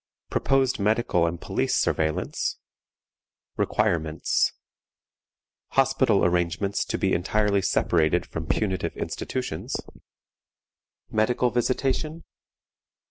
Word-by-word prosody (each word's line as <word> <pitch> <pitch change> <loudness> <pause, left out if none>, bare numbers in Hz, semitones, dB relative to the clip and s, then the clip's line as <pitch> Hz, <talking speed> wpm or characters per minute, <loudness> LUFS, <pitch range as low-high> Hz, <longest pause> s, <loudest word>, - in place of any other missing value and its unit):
Proposed 135 -3 +2
medical 105 -4 +2
and 85 0 -3
police - - -1
Surveillance. 80 -1 0 1.0
Requirements. 80 -2 +1 1.2
Hospital 130 -5 +3
Arrangements 90 +3 0
to - - -2
be - - +1
entirely 100 +3 +1
separated 85 -2 +2
from 80 0 -6
punitive 95 -1 -1
Institutions. 125 -12 -4 1.4
Medical 120 +3 +2
Visitation. 135 +6 -1
100 Hz, 80 wpm, -25 LUFS, 85-125 Hz, 1.4 s, Hospital